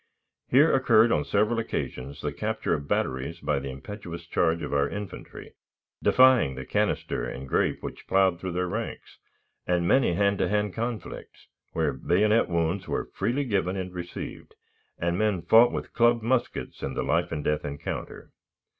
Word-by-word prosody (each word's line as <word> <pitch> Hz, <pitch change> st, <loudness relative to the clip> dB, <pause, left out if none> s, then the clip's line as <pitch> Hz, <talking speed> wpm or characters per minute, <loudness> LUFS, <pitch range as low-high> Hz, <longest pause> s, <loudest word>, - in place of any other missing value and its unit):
Here 145 Hz, +6 st, +5 dB
occurred 115 Hz, -3 st, +5 dB
on 75 Hz, -, +1 dB
several 105 Hz, +3 st, +1 dB
occasions 70 Hz, -, -4 dB
the -, -, -3 dB
capture -, -, -2 dB
of 70 Hz, -, -3 dB
batteries 65 Hz, +7 st, -1 dB
by 75 Hz, -4 st, 0 dB
the 70 Hz, 0 st, -6 dB
impetuous 85 Hz, +4 st, -8 dB
charge 85 Hz, -1 st, +1 dB
of 75 Hz, -, -4 dB
our 70 Hz, 0 st, +2 dB
infantry, 105 Hz, -1 st, -8 dB, 0.5 s
defying 130 Hz, -, +5 dB
the 65 Hz, 0 st, -6 dB
canister -, -, -1 dB
and 65 Hz, +2 st, -6 dB
grape -, -, 0 dB
which -, -, -8 dB
plowed 95 Hz, -3 st, +3 dB
through 90 Hz, 0 st, -4 dB
their 90 Hz, +1 st, 0 dB
ranks, -, -, -6 dB, 0.5 s
and 90 Hz, -1 st, +1 dB
many 120 Hz, -5 st, +3 dB
hand 100 Hz, 0 st, +2 dB
to 95 Hz, -, +2 dB
hand 105 Hz, -1 st, 0 dB
conflicts, 115 Hz, -1 st, -6 dB, 0.3 s
where -, -, 0 dB
bayonet 105 Hz, +1 st, +2 dB
wounds 85 Hz, +2 st, -1 dB
were -, -, -3 dB
freely 130 Hz, +5 st, 0 dB
given 95 Hz, -6 st, -1 dB
and 90 Hz, -1 st, -5 dB
received, 90 Hz, -1 st, -7 dB, 0.4 s
and 85 Hz, +1 st, -1 dB
men 105 Hz, -6 st, +1 dB
fought 115 Hz, +7 st, +6 dB
with -, -, -5 dB
clubbed 120 Hz, -1 st, +3 dB
muskets 120 Hz, +1 st, -1 dB
in -, -, -4 dB
the -, -, -1 dB
life -, -, 0 dB
and 75 Hz, -2 st, -3 dB
death 75 Hz, 0 st, 0 dB
encounter. 70 Hz, -1 st, -6 dB
95 Hz, 165 wpm, -27 LUFS, 80-110 Hz, 0.5 s, fought